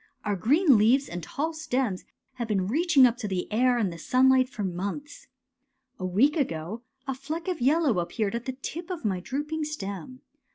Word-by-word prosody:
Our 205 -1 0
green 270 - +4
leaves 250 +6 +4
and 175 0 -5
tall 310 - -3
stems 255 -10 -2 0.3
have 235 -2 -3
been 195 -4 0
reaching 285 - +4
up 240 -1 +2
to 220 - -4
the 185 -2 -2
air 250 +2 +3
and 200 -7 0
the 170 - -10
sunlight 255 +5 +4
for 215 - -5
months. 200 - -5 0.4
'' - - -48
A 185 - -3
week 235 - +3
ago 205 - -2 0.2
a 270 - -2
fleck 310 +6 -5
of 360 -6 -2
yellow 280 - +3
appeared 200 +4 -2
at 235 0 -4
the 260 - -3
tip 340 +3 -5
of 355 -9 -5
my 190 -3 0
drooping 295 - -3
stem. 255 - -6
250 Hz, 195 wpm, -27 LUFS, 200-295 Hz, 0.4 s, green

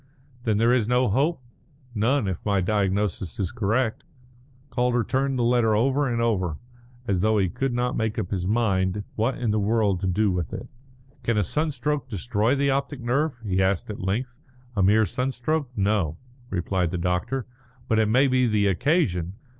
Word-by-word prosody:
"Then 110 -3 +2
there 115 +3 +4
is 120 -4 +2
no 125 0 +2
hope?" 140 - +1 0.5
"None, 120 +2 +1
if 95 -3 -3
my 100 -2 +1
diagnosis 100 -2 -1
is 95 -3 -1
correct." 110 +2 0 0.7
Calder 125 -1 +1
turned 135 +2 0
the 120 - +1
letter 115 -2 +3
over 135 +5 +2
and 115 - -1
over, 95 -9 0 0.5
as 95 -4 +1
though 110 +1 +3
he 95 -3 +2
could 135 +8 -2
not 125 +1 -1
make 110 +1 -1
up 100 -5 -3
his 90 -3 -1
mind 100 -3 +1
what 115 +4 0
in 120 -4 0
the 105 - +1
world 105 -2 +1
to 95 - -2
do 100 +3 +2
with 90 -3 -3
it. - - -6 0.5
"Can 115 -2 0
a 105 - +3
sunstroke 150 - -1
destroy 115 +3 0
the 140 0 +2
optic 140 +1 -2
nerve?" 130 +3 0
he 95 -2 +1
asked 95 +2 0
at 105 - -7
length. 120 +7 -2 0.4
"A 100 - +1
mere 105 +3 +4
sunstroke? 135 +5 -2
No," 95 -6 0 0.3
replied 90 -1 -1
the 90 - -3
doctor. 90 +9 -1 0.4
"But 110 - +2
it 110 - +3
may 130 +5 +4
be 130 -1 +3
the 105 -2 +2
occasion. 100 - +1
110 Hz, 180 wpm, -25 LUFS, 95-125 Hz, 0.7 s, there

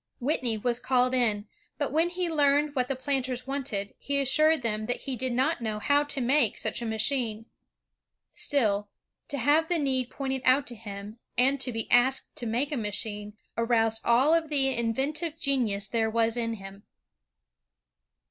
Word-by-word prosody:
'' - - -49
Whitney 245 -4 0
was 240 +2 0
called 255 0 +2
in, 220 -5 +1 0.3
but 290 - -2
when 325 +4 +2
he 360 0 -2
learned 295 -2 +2
what 255 -3 0
the 270 - -2
planters 255 -1 -2
wanted, 250 -8 -4
he 280 0 -1
assured 305 +2 +4
them 215 -1 -1
that 245 - -2
he 270 - -3
did 255 +2 -2
not 265 +5 0
know 215 -2 -2
how 285 +7 +2
to 290 -1 -5
make 255 -2 +2
such 220 +2 -2
a 235 - -3
machine. 220 0 -1 0.9
Still, 210 -7 +1 0.4
to 285 - -4
have 295 +6 +3
the 350 - +1
need 260 -4 0
pointed 265 -1 -3
out 260 +2 +4
to 240 - -7
him, 205 0 -9 0.2
and 270 +3 +3
to 255 - +1
be 225 -1 -2
asked 260 +2 +2
to 240 - -4
make 245 +7 -1
a 290 - -1
machine, 210 -1 -3 0.2
aroused 225 -1 +1
all 255 +7 +4
of 330 -2 +1
the 270 -3 +2
inventive 285 +8 -1
genius 235 -9 +1
there 225 -1 0
was 230 0 +1
in 230 -1 -1
him. 195 -1 -11
250 Hz, 175 wpm, -27 LUFS, 225-280 Hz, 0.9 s, assured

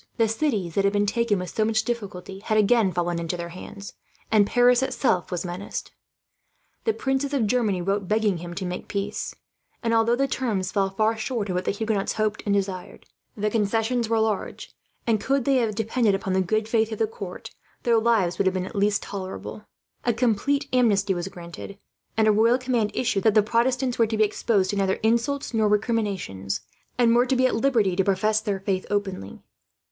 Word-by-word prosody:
The 225 - +3
cities 220 - -1
that 200 - +1
had 200 +1 +2
been 205 0 +2
taken 220 0 +1
with 180 -1 -5
so 220 - +2
much 220 0 +1
difficulty 195 -5 -5
had 215 +1 -1
again 215 -1 +4
fallen 175 0 -1
into 170 +1 -3
their 170 0 -5
hands, 195 +3 -9 0.4
and 210 -2 +5
Paris 245 +1 +4
itself 255 -8 0
was 180 0 -3
menaced. 180 +3 -5 0.9
The 450 - +3
princes 270 -1 -1
of 245 -5 +2
Germany 210 -5 +1
wrote, 195 +1 -1
begging 210 -2 +1
him 175 +1 -7
to 190 - -4
make 180 0 -5
peace; 200 +1 -3 0.5
and 230 0 +1
although 230 +1 +3
the 275 +2 +1
terms 215 -9 -1
fell 195 -2 +1
far 215 +3 +1
short 220 -3 -3
of 180 - -1
what 180 - -1
the - - 0
Huguenots 210 -1 -1
hoped 215 -1 -1
and 200 - +3
desired, 190 -2 -4 0.3
the 210 +1 0
concessions 225 +2 0
were 225 -1 +2
large 220 -3 -2 0.3
and, 220 -3 +1
could 270 -2 0
they 275 -1 +3
have 225 -4 0
depended 225 -1 +1
upon 195 -1 -2
the 190 - +3
good 215 +4 0
faith 225 -1 +1
of 220 - -3
the 225 - +2
court, 200 -4 -8 0.3
their 230 -2 +4
lives 220 -6 +1
would 195 - +2
have 190 0 +1
at 185 +1 -4
least 205 0 +1
been - - -10
tolerable. 195 +2 -6 0.4
A 240 - +2
complete 260 +5 +1
amnesty 210 -6 +3
was 175 0 -3
granted, 175 +2 -9 0.4
and 220 -1 +4
a - - +6
royal 225 +4 +4
command 245 -4 0
issued 230 -6 0
that 220 - +4
the 215 - +6
Protestants 245 +3 0
were 230 - +4
to 220 0 -2
be 215 - +5
exposed 205 -2 +1
to - - -3
neither 195 -1 +1
insults 235 +5 0
nor 220 -1 +2
recriminations, 200 - -1 0.4
and 235 -1 +4
were 245 +1 +4
to 265 - +2
be 255 0 +3
at 255 - +2
liberty 225 -7 +2
to 190 - +2
profess 210 +3 +1
their 205 -3 -2
faith 190 -1 -2
openly. 195 - -3
215 Hz, 205 wpm, -25 LUFS, 195-230 Hz, 0.9 s, a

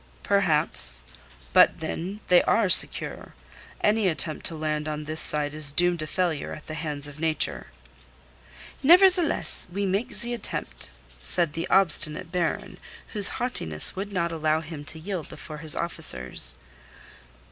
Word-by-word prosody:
"Perhaps. - - +4 0.5
But, - - +5
then, 180 +6 -5
they 180 -1 +5
are 215 -4 +2
secure. - - 0 0.5
Any 210 -1 +2
attempt 160 -2 -2
to 165 - -6
land 155 -1 -3
on 150 0 -4
this 155 +1 +2
side 150 -1 +2
is 150 -2 +2
doomed 175 +3 +1
to 155 - -4
failure 170 -3 -2
at 155 - -11
the 155 - -8
hands 150 -2 -4
of 145 +1 -12
Nature." 160 -1 -1 1.1
"Nevertheless, 355 +2 +4
we 200 +3 -2
make 195 +5 -2
the 240 0 -2
attempt," 235 - -5 0.3
said 170 - 0
the 165 +1 -4
obstinate 165 -4 +2
Baron, 180 -2 -3 0.3
whose 205 -3 +2
haughtiness 80 - 0
would 200 +2 -5
not 170 -3 -1
allow 155 -1 0
him 155 -2 -9
to 160 - -4
yield 180 -2 -6
before 155 -1 -10
his 155 0 +2
officers. 65 - -2
165 Hz, 145 wpm, -25 LUFS, 155-190 Hz, 1.1 s, But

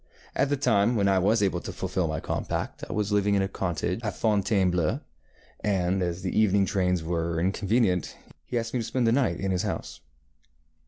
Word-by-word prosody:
At 140 - +1
the 145 - +1
time 120 -3 +3
when 100 -3 +2
I 95 -1 +4
was 105 +3 +3
able 95 -3 +1
to - - -6
fulfil - - -2
my - - -2
compact - - -3
I - - -3
was 105 -1 -1
living 100 0 +2
in 100 - +2
a - - 0
cottage 90 0 -2
at 105 -5 -3
Fontainebleau, 95 -6 +1 0.6
and 95 -2 +1
as 90 0 -2
the 90 - -2
evening 100 -2 +4
trains 90 -4 0
were 85 0 -1
inconvenient, 95 - +1 0.3
he 120 - -3
asked 115 0 -3
me 125 - 0
to - - -2
spend 125 +2 0
the 115 - +4
night 130 +1 +1
in 95 -1 -1
his 90 -1 +1
house. - - -4
100 Hz, 200 wpm, -27 LUFS, 90-110 Hz, 0.6 s, I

